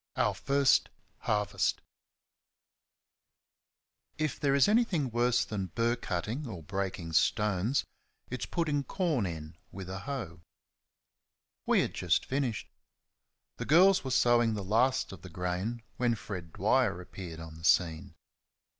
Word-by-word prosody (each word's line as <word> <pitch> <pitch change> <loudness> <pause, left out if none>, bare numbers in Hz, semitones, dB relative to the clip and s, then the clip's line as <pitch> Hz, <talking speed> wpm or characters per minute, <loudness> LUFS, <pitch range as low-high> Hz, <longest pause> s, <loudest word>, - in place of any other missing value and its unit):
Our - - +2
First 140 -1 +3 0.3
Harvest 105 -1 0 2.4
If 155 -3 -2
there 140 -1 +2
is 140 - +5
anything 205 - +2
worse 120 +1 +2
than 100 -3 -3
burr 115 +7 0
cutting 115 - -3
or 90 -8 -7
breaking 90 -1 -4
stones, 105 - +2 0.4
it's 125 - -4
putting 150 -5 0
corn 155 - 0
in 80 -2 -7
with 95 -1 -7
a 95 - -4
hoe. 100 -9 -5 1.3
We - - +4
had - - -2
just - - +1
finished. 130 -5 -2 0.9
The - - -4
girls 185 +5 +5
were 135 - -4
sowing 120 -3 +3
the 100 - -4
last 115 +7 +2
of 95 - -10
the 95 - -10
grain 90 +7 -3
when 120 -2 +2
Fred 90 -6 -7
Dwyer 105 0 +2
appeared 90 -2 -8
on 80 -1 -8
the 80 +1 -13
scene. 80 -1 +2
110 Hz, 130 wpm, -30 LUFS, 90-130 Hz, 2.4 s, is